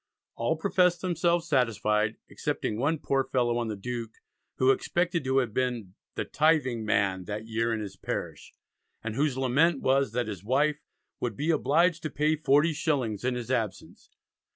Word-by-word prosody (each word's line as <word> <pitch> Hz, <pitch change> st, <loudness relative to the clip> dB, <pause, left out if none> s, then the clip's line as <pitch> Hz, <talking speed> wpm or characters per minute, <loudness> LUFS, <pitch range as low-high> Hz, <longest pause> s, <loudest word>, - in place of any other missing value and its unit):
All 115 Hz, +8 st, 0 dB
professed 180 Hz, 0 st, +2 dB
themselves 175 Hz, -1 st, +1 dB
satisfied, 110 Hz, -, +1 dB
excepting 105 Hz, -, -3 dB
one 150 Hz, +5 st, +1 dB
poor 135 Hz, -2 st, 0 dB
fellow 120 Hz, -2 st, 0 dB
on 120 Hz, -, -2 dB
the 110 Hz, -, -3 dB
Duke, 115 Hz, +2 st, -5 dB, 0.5 s
who 130 Hz, +1 st, +4 dB
expected 175 Hz, +3 st, 0 dB
to 130 Hz, +1 st, +1 dB
have 125 Hz, -5 st, +1 dB
been 120 Hz, -7 st, -2 dB, 0.2 s
"the -, -, -2 dB
Tything 150 Hz, -7 st, +2 dB
man 95 Hz, -3 st, +1 dB
that 105 Hz, +2 st, -5 dB
year 115 Hz, +1 st, -1 dB
in 110 Hz, -1 st, -1 dB
his 100 Hz, -2 st, -7 dB
parish," -, -, -5 dB, 0.5 s
and 115 Hz, -1 st, -3 dB
whose 140 Hz, +1 st, 0 dB
lament 140 Hz, +4 st, +2 dB
was 135 Hz, -2 st, +2 dB
that 120 Hz, -1 st, -1 dB
his 100 Hz, -4 st, -6 dB
wife 145 Hz, +6 st, +1 dB, 0.4 s
"would 115 Hz, -4 st, -3 dB
be 155 Hz, +3 st, +1 dB
obliged 165 Hz, +2 st, +2 dB
to 155 Hz, -, -3 dB
pay 150 Hz, +2 st, +1 dB
forty 150 Hz, +2 st, +3 dB
shillings 130 Hz, -9 st, -1 dB
in 130 Hz, 0 st, 0 dB
his 120 Hz, 0 st, -4 dB
absence." 110 Hz, -6 st, -3 dB
130 Hz, 170 wpm, -28 LUFS, 110-155 Hz, 0.5 s, who